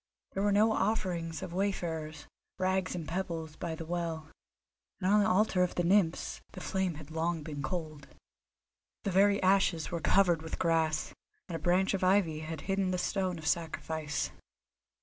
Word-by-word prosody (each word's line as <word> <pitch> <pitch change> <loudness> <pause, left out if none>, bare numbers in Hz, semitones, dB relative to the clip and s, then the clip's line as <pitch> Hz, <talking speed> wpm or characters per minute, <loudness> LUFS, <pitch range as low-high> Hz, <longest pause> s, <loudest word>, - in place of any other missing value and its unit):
There 195 - -2
were 205 0 +3
no 215 +2 +4
offerings 180 -8 -1
of 170 - -6
wayfarers, 165 -5 -2 0.3
rags 185 0 0
and 165 -3 -5
pebbles, 165 -4 -3
by 165 -1 -4
the 165 - -7
well; 165 -2 -3 0.7
and 185 - -1
on 210 - +6
the 210 +1 +3
altar 195 -1 +3
of 180 - +1
the 175 - +1
Nymphs 175 -2 +2
the - - -7
flame 190 -3 -1
had 155 0 -10
long 165 0 -1
been 145 -2 -5
cold. 155 -1 -4 1.0
The 200 - -1
very 200 +2 +4
ashes 185 -4 +3
were 170 -1 -2
covered 175 -4 +4
with 160 - -5
grass, 160 -2 +1 0.3
and 175 - -4
a - - -3
branch 180 +5 +2
of 190 - -1
ivy 185 -5 +3
had 155 -1 -5
hidden 195 +3 0
the 185 - 0
stone 185 -1 -1
of 160 - -9
sacrifice. 160 -3 -1
175 Hz, 170 wpm, -31 LUFS, 160-190 Hz, 1.0 s, on